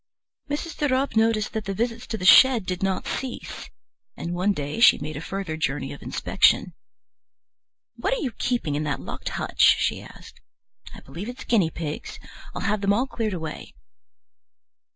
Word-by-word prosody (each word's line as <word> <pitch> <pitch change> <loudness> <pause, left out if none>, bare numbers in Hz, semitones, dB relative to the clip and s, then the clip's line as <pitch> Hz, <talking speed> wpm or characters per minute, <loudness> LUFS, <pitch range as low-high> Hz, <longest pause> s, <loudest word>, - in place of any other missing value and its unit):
Mrs. 300 +3 -4
de 295 - +1
Ropp 260 0 0
noticed 220 -1 +2
that 220 -1 -3
the 195 0 -3
visits 235 +2 -2
to 220 - -3
the 185 - -5
shed 245 0 +7
did 180 +1 -3
not 195 -1 -1
cease, 260 -2 -5 0.5
and 170 - -4
one 185 +3 +1
day 145 0 -4
she 235 - +7
made 150 +1 -6
a 150 - -5
further 195 -2 -4
journey 140 -3 -2
of 140 - -12
inspection. 185 -2 +2 1.2
"What 365 - 0
are - - -4
you 265 - -2
keeping 235 - -1
in 145 - -1
that 140 -2 -2
locked - - -6
hutch?" - - -2 0.2
she - - -1
asked. - - -14 0.5
"I - - -11
believe 170 - -8
it's 250 - -8
guinea 200 -9 +2
pigs. 155 -2 -6 0.4
I'll - - -4
have 210 -1 0
them 200 0 +3
all 240 +5 +1
cleared 225 -6 -3
away." 160 - -7
200 Hz, 175 wpm, -24 LUFS, 165-235 Hz, 1.2 s, shed